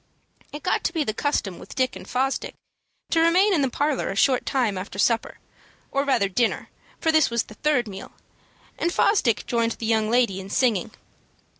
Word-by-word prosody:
It 295 0 -8
got 370 - 0
to - - 0
be 320 -3 0
the 215 - -2
custom 215 -8 -2
with - - -11
Dick 255 -1 0
and - - -10
Fosdick 265 +2 -1 0.6
to 330 - +3
remain 360 +5 +4
in 320 - +2
the 270 - +1
parlor 290 +2 -1
a 195 - -3
short 255 +4 +2
time 245 -7 +1
after 185 +1 -6
supper, 230 +3 +1 0.5
or 275 - +1
rather 260 -8 +2
dinner, 225 +4 -1 0.3
for 320 - +2
this 315 -2 +4
was 235 -1 0
the - - -14
third 250 0 0
meal, 195 -1 -9 0.7
and 345 - 0
Fosdick 280 - +2
joined 230 -1 0
the 230 - -7
young 220 -1 +1
lady 235 -5 +2
in 190 - -10
singing. 220 -4 +1
250 Hz, 190 wpm, -24 LUFS, 215-295 Hz, 0.7 s, remain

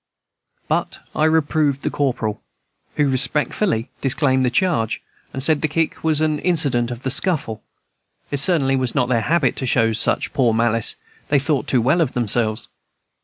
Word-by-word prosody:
But - - -1 0.2
I 155 - +2
reproved 155 -3 +1
the - - -1
corporal, 115 -6 -2 0.5
who 150 - +2
respectfully 135 - 0
disclaimed 130 -1 +1
the 125 - +2
charge, 125 - 0 0.3
and 135 - -4
said 155 0 +2
the 155 - +1
kick 160 +2 -2
was 155 -1 +1
an 155 -1 0
incident 140 -10 0
of 120 0 -7
the 130 - -1
scuffle. 140 - 0 0.7
It 145 - -1
certainly 140 -3 +3
was 130 -2 -1
not 125 - +1
their 120 -3 +1
habit 155 0 +1
to 130 - -3
show 115 -2 +2
such 110 - 0
poor 120 -5 +2
malice; 115 -1 +1 0.3
they 145 - +2
thought 140 0 0
too 125 -4 +2
well 145 +8 +2
of 150 - 0
themselves. 110 -1 +1
135 Hz, 170 wpm, -20 LUFS, 120-155 Hz, 0.7 s, certainly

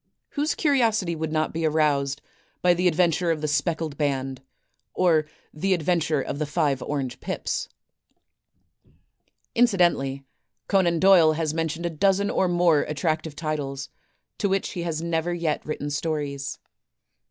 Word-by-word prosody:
Whose 295 +2 -1
curiosity 225 - +2
would 160 0 -3
not 155 0 0
be 165 +1 -2
aroused 150 -3 +1 0.4
by 180 0 +6
"The 180 +1 +1
Adventure 175 0 +2
of 160 -2 0
the 155 - -1
Speckled 155 0 -1
Band," 135 -2 -1 0.5
or 160 -4 +3 0.3
"The 185 +5 +1
Adventure 160 -4 0
of 140 - -5
the 150 - -1
Five 145 -4 0
Orange 135 -3 -3
Pips"? - - -3 1.8
Incidentally, 175 - +2 0.4
Conan 175 -4 +2
Doyle 180 -4 +6
has 155 -1 -1
mentioned 165 +1 -2
a 170 - -1
dozen 195 +5 +2
or 190 - +2
more 175 -3 +3
attractive 155 0 -2
titles, 140 -4 -4 0.5
to 200 - +1
which 195 0 0
he 180 - -5
has 165 -1 -3
never 170 +1 -1
yet 165 -3 -1
written 145 -1 -3
stories. 145 -2 -3
160 Hz, 140 wpm, -25 LUFS, 150-175 Hz, 1.8 s, by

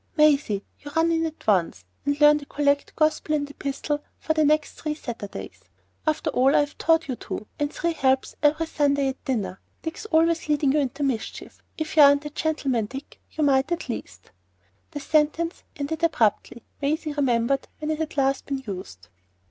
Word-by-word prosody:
""Maisie, 280 -10 +3 0.2
you 290 - -9
run 325 +1 +3
in 325 0 +1
at 315 - -10
once, 175 - +1 0.2
and 285 0 +1
learn 295 0 +7
the 285 - -12
collect, 285 -1 0
gospel, 310 0 +1
and 290 -1 -1
epistle 290 +1 -3
for 315 - -1
the 310 -1 +2
next 300 0 +2
three 305 -1 -2
Sundays. 230 -8 -7 0.5
After 310 0 +1
all 270 +2 +3
I've 290 0 +2
taught 325 -1 +3
you, 260 - -2
too, 215 - -6
and 290 0 0
three 340 +1 -1
helps 265 -3 +1
every 305 +2 +3
Sunday 285 -3 +1
at 265 - -7
dinner! 220 -8 -2 0.2
Dick's 325 +6 -5
always 330 -2 +2
leading 290 -2 +3
you 300 - +2
into 280 +1 -2
mischief. 255 -5 -3 0.2
If 315 0 -4
you 310 - +7
aren't 285 +1 +6
a 295 - -5
gentleman, 275 -8 -1
Dick, 270 +5 -9
you 310 - -1
might 275 +2 +3
at 345 -5 -2
least—"' 95 - -7 0.6
The 290 - -6
sentence 310 +3 +1
ended 305 +3 -3
abruptly. 235 -6 +1 0.2
Maisie 300 +1 -1
remembered 270 -1 +1
when 305 0 -3
it 310 - -2
had 320 -1 -4
last 275 0 +1
been 275 -1 -3
used. 140 - -7
290 Hz, 180 wpm, -25 LUFS, 265-310 Hz, 0.6 s, learn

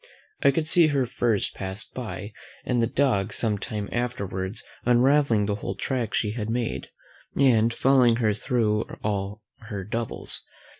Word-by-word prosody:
I - - +6
could 155 +3 0
see 165 0 +5
her 140 -4 +1
first 115 -3 0
pass 95 +1 -5
by, 110 -4 -6 0.3
and 125 -2 +1
the 115 - +3
dogs 125 -6 +1
some 105 -3 0
time 105 0 -4
afterwards 100 -4 -3 0.2
unravelling 125 -2 +4
the 105 - 0
whole 100 - -4
track 125 -5 -2
she 105 - +1
had 110 -1 -4
made, 120 0 -2 0.5
and 120 -5 +4
following 125 -1 +4
her 110 -3 +2
thro' 110 -1 0
all 105 0 -2 0.2
her 100 -3 -4
doubles. 115 +3 -3
115 Hz, 150 wpm, -26 LUFS, 105-125 Hz, 0.5 s, I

